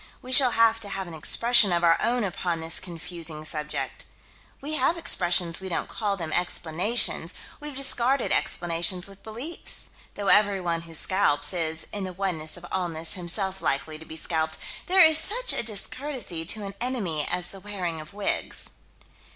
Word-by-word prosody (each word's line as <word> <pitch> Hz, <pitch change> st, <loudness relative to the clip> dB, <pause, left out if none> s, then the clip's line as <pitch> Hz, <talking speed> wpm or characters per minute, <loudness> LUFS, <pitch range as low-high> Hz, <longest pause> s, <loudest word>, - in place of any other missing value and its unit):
We 255 Hz, -, -10 dB
shall 260 Hz, 0 st, +9 dB
have 225 Hz, 0 st, +3 dB
to 205 Hz, -, -6 dB
have 195 Hz, -1 st, -4 dB
an 170 Hz, -, -10 dB
expression 230 Hz, +6 st, +4 dB
of 175 Hz, 0 st, 0 dB
our 165 Hz, -1 st, +5 dB
own 240 Hz, 0 st, 0 dB
upon 175 Hz, -3 st, -3 dB
this 165 Hz, 0 st, +3 dB
confusing 165 Hz, -3 st, -6 dB
subject. 150 Hz, -1 st, -4 dB, 0.5 s
We 295 Hz, +3 st, -5 dB
have 310 Hz, +4 st, +1 dB
expressions: 175 Hz, -, 0 dB
we 190 Hz, -, -6 dB
don't 170 Hz, -, -3 dB
call 205 Hz, -3 st, -3 dB
them 165 Hz, -3 st, -5 dB
explanations: 180 Hz, +5 st, +2 dB, 0.2 s
we've 295 Hz, -2 st, -7 dB
discarded 270 Hz, -1 st, +1 dB
explanations 175 Hz, +1 st, 0 dB
with 195 Hz, 0 st, -12 dB
beliefs. 240 Hz, +10 st, -3 dB, 0.2 s
Though 200 Hz, -1 st, -3 dB
everyone 180 Hz, -5 st, +1 dB
who 165 Hz, -, -7 dB
scalps 150 Hz, -4 st, +2 dB
is, 160 Hz, -2 st, +3 dB
in 205 Hz, -2 st, -4 dB
the 185 Hz, -1 st, -6 dB
oneness 175 Hz, -4 st, 0 dB
of 175 Hz, -, -12 dB
allness, 165 Hz, -3 st, 0 dB
himself 190 Hz, +1 st, -2 dB
likely 140 Hz, +3 st, -3 dB
to 160 Hz, -, -11 dB
be 160 Hz, -, -8 dB
scalped, 160 Hz, -1 st, 0 dB, 0.3 s
there 375 Hz, 0 st, +6 dB
is 315 Hz, 0 st, +6 dB
such 485 Hz, +9 st, +2 dB
a -, -, +1 dB
discourtesy 235 Hz, -, -3 dB
to 210 Hz, +5 st, +1 dB
an 195 Hz, -, -7 dB
enemy 200 Hz, -, -1 dB
as 180 Hz, 0 st, -2 dB
the 195 Hz, -, -10 dB
wearing 185 Hz, -5 st, -5 dB
of 155 Hz, -, -14 dB
wigs. 200 Hz, 0 st, -1 dB
185 Hz, 170 wpm, -25 LUFS, 165-225 Hz, 0.5 s, shall